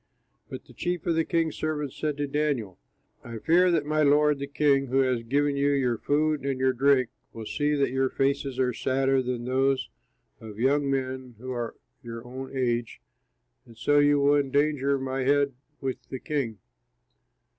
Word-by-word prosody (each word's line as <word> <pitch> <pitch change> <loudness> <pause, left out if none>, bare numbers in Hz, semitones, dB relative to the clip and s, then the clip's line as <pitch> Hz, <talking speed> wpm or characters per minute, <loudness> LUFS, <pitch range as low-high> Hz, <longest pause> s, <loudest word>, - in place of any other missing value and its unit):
But - - -8
the - - -17
chief 175 -1 -3
of 170 - +2
the 165 0 +2
king's 165 -2 0
servants 150 -3 -3
said 150 -2 -2
to 145 - -1
Daniel, 140 -9 -2 0.4
"I 115 -1 -7
fear 175 +9 +4
that 165 -4 +1
my 155 +1 +1
lord, 150 0 +4
the 140 - -4
king, 140 -1 +2
who 135 +2 +2
has 130 -3 +1
given 140 +4 0
you 140 +1 +2
your 125 -5 0
food 150 -1 +1
and 135 -2 -2
your 130 0 +2
drink 130 -1 +3 0.2
will 115 -1 -7
see 150 +6 0
that 140 -2 +1
your 130 0 +1
faces 135 -1 -1
are 125 -1 +1
sadder 135 +2 +1
than 125 -1 -3
those 130 +1 +1 0.5
of 110 -2 -10
young 140 +3 +2
men 130 -2 -3
who 130 +3 -7
are 120 -2 -4 0.3
your 115 0 -8
own 130 +2 -7
age, 120 -2 -1 0.6
and 115 -3 -17
so 145 +5 +3
you 145 0 +4
will 145 +1 +4
endanger 140 0 +1
my 135 0 -3
head 140 +1 +2 0.3
with 135 -2 -3
the 130 - -5
king." 135 -9 -3
135 Hz, 180 wpm, -27 LUFS, 130-145 Hz, 0.6 s, fear